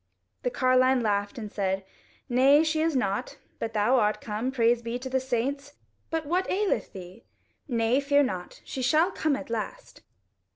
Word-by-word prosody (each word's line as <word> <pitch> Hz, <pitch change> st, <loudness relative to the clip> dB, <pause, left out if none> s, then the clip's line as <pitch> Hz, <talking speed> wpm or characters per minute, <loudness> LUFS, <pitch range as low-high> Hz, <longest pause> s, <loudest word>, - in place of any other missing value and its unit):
The 250 Hz, -, 0 dB
carline 255 Hz, 0 st, +3 dB
laughed 205 Hz, 0 st, -1 dB
and 215 Hz, -3 st, -6 dB
said, 190 Hz, -1 st, -2 dB, 0.4 s
"Nay, 270 Hz, +5 st, +5 dB
she 315 Hz, 0 st, 0 dB
is 320 Hz, -2 st, +1 dB
not, 200 Hz, -6 st, -1 dB, 0.2 s
but 225 Hz, 0 st, -3 dB
thou 220 Hz, +5 st, +3 dB
art 210 Hz, -1 st, +1 dB
come: 220 Hz, +4 st, -3 dB
praise 235 Hz, -2 st, +2 dB
be 235 Hz, +1 st, -3 dB
to 260 Hz, +1 st, -7 dB
the 260 Hz, -, +2 dB
saints! 265 Hz, +3 st, -2 dB, 0.4 s
But 325 Hz, -1 st, -2 dB
what 360 Hz, +5 st, 0 dB
aileth 405 Hz, +1 st, 0 dB
thee? 185 Hz, +4 st, -11 dB, 0.4 s
Nay, 235 Hz, 0 st, +2 dB
fear 285 Hz, 0 st, +3 dB
not, 185 Hz, -8 st, -5 dB
she 265 Hz, -, -5 dB
shall 310 Hz, +8 st, +3 dB
come 310 Hz, -5 st, 0 dB
at 275 Hz, -3 st, -7 dB
last." 235 Hz, -, -5 dB
255 Hz, 170 wpm, -27 LUFS, 220-285 Hz, 0.4 s, Nay